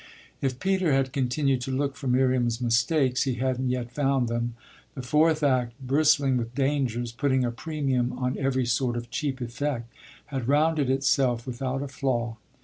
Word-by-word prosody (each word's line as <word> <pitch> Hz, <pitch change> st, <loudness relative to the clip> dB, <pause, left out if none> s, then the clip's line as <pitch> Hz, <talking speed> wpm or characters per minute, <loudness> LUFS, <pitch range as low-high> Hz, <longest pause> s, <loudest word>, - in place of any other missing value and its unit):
If 130 Hz, -2 st, -1 dB
Peter 190 Hz, -5 st, +1 dB
had 135 Hz, -1 st, +1 dB
continued 135 Hz, 0 st, +1 dB
to 130 Hz, -, -4 dB
look 140 Hz, +1 st, -1 dB
for 135 Hz, -, -6 dB
Miriam's 125 Hz, -2 st, +2 dB
mistakes 130 Hz, +2 st, +2 dB
he 130 Hz, -3 st, 0 dB
hadn't 130 Hz, +1 st, -1 dB
yet 125 Hz, -1 st, -2 dB
found 135 Hz, -2 st, +1 dB
them: 120 Hz, 0 st, -2 dB, 0.4 s
the 130 Hz, -, -6 dB
fourth 155 Hz, +4 st, +3 dB
act, 125 Hz, -4 st, +2 dB
bristling 140 Hz, 0 st, +3 dB
with 120 Hz, 0 st, -4 dB
dangers, 135 Hz, -4 st, 0 dB
putting 130 Hz, +1 st, +1 dB
a 120 Hz, -, -1 dB
premium 135 Hz, -2 st, -1 dB
on 125 Hz, 0 st, -1 dB
every 130 Hz, -2 st, +1 dB
sort 120 Hz, 0 st, 0 dB
of 120 Hz, 0 st, -7 dB
cheap 135 Hz, 0 st, -2 dB
effect, 120 Hz, -1 st, -3 dB, 0.3 s
had 135 Hz, -4 st, -4 dB
rounded 150 Hz, 0 st, +2 dB
itself 130 Hz, -3 st, +2 dB
without 130 Hz, +2 st, -3 dB
a -, -, -4 dB
flaw. 120 Hz, -4 st, -2 dB
130 Hz, 165 wpm, -26 LUFS, 120-140 Hz, 0.4 s, fourth